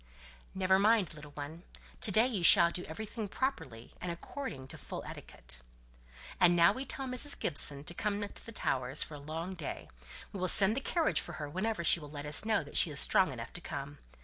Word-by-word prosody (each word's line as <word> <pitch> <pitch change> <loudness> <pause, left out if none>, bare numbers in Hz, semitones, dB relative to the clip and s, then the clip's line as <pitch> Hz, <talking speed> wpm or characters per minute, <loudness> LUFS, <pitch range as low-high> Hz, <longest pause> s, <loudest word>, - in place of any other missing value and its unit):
"Never 190 0 +2
mind, 205 -4 +2
little 150 -1 -12
one. 150 +4 -8 0.4
To 210 - 0
day 220 +4 +4
you 230 -7 -2
shall 170 0 +8
do 180 - -4
everything 215 +6 -6
properly, 140 - -5
and 180 - -4
according 170 - -7
to - - -7
full - - -8
etiquette." - - -5 0.8
"And 175 -1 +5
now 170 +3 +5
tell 270 - -4
Mrs. 260 +3 +2
Gibson 140 0 +2
to 175 - -5
come 205 +3 -3
out 205 - -7
to - - -4
the - - -8
Towers 130 - -1
for - - -11
a 145 - -8
long 160 +5 -6
day; 170 -6 -7 0.4
we 195 - -6
will 185 - -1
send 195 +3 +6
the 275 - -3
carriage 330 +3 0
for - - -9
her 145 - -6
whenever 190 +5 -3
she 170 - +4
will 150 -2 -11
let 145 0 -8
us 150 +4 +3
know 220 -6 +1
that 145 - -3
she - - +6
is 145 -2 -2
strong 185 -5 +5
enough 115 -2 -8
to 175 - -9
come. 140 -2 -7
175 Hz, 215 wpm, -31 LUFS, 145-210 Hz, 0.8 s, shall